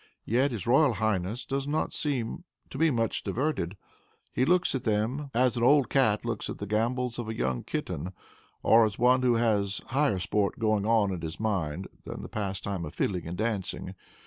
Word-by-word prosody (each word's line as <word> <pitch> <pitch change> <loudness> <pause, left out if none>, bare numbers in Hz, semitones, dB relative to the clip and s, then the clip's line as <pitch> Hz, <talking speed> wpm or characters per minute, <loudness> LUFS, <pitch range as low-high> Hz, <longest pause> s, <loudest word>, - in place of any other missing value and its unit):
Yet 130 +5 +2
his 110 -6 -4
royal 135 +2 +4
highness 110 +1 -1
does 135 0 -2
not 150 +2 -1
seem 140 +1 -2 0.3
to - - -6
be 165 0 +5
much 115 -5 0
diverted. 105 - -1 0.5
He 130 - +1
looks 180 +2 +3
at 130 - -2
them 115 +7 0
as 125 +1 +2
an 120 - -2
old 140 +2 +4
cat 115 -6 +2
looks 115 -1 -3
at - - -5
the 100 - -5
gambols 120 +4 -1
of 115 -2 -4
a 110 - -3
young 65 -1 -1
kitten; 90 +6 -4 0.5
or 115 +1 +6
as 105 -2 0
one 125 +1 +4
who 125 -2 +3
has 105 -4 +1
higher 130 -6 +2
sport 100 +2 0
going 110 -2 +1
on 110 -3 +3
in 90 -3 -4
his 80 0 -5
mind 95 -5 -1 0.2
than - - -7
the - - -7
pastime 100 -2 -3
of 75 +1 -7
fiddling 90 -5 -1
and 85 +2 -5
dancing. 100 -4 -3
110 Hz, 195 wpm, -28 LUFS, 100-125 Hz, 0.5 s, or